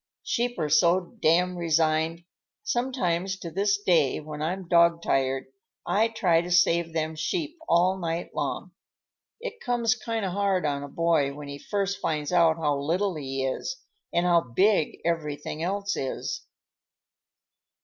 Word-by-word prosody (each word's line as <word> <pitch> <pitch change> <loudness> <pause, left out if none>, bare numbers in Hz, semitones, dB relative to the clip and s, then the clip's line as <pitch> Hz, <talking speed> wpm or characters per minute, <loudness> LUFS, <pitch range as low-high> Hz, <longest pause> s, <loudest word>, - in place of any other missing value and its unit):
Sheep 240 +1 -1
are 155 -3 0
so 170 +4 +4 0.2
damned 180 +3 +3
resigned. 160 0 +1 0.4
Sometimes, 195 -8 -1
to 170 -3 -7
this 200 +3 +1
day, 165 -9 +2
when 150 0 -7
I'm 180 +3 -3
dog 170 -1 +4
tired, 135 0 0 0.4
I 220 +3 +2
try 180 -7 +2
to 175 - -6
save 170 -1 +3
them 160 0 -2
sheep 320 - -3
all 185 +3 +3
night 170 -1 -3
long. - - -3 0.7
It 470 -1 -6
comes 240 -2 +1
kind 230 -3 -3
of 185 - -2
hard 195 -2 +1
on 140 -1 -1
a 145 - -6
boy 155 -4 +1
when 145 -1 -8
he 140 0 -7
first 200 +1 -2
finds 150 -1 -1
out 165 -2 +4
how 150 -3 0
little 180 +7 0
he 135 -3 -3
is, 135 - -3 0.3
and 170 +1 +1
how 170 -1 +4
big 165 - +2
everything 155 -2 -2
else 200 +3 -1
is." 130 - -4
170 Hz, 150 wpm, -26 LUFS, 155-195 Hz, 0.7 s, so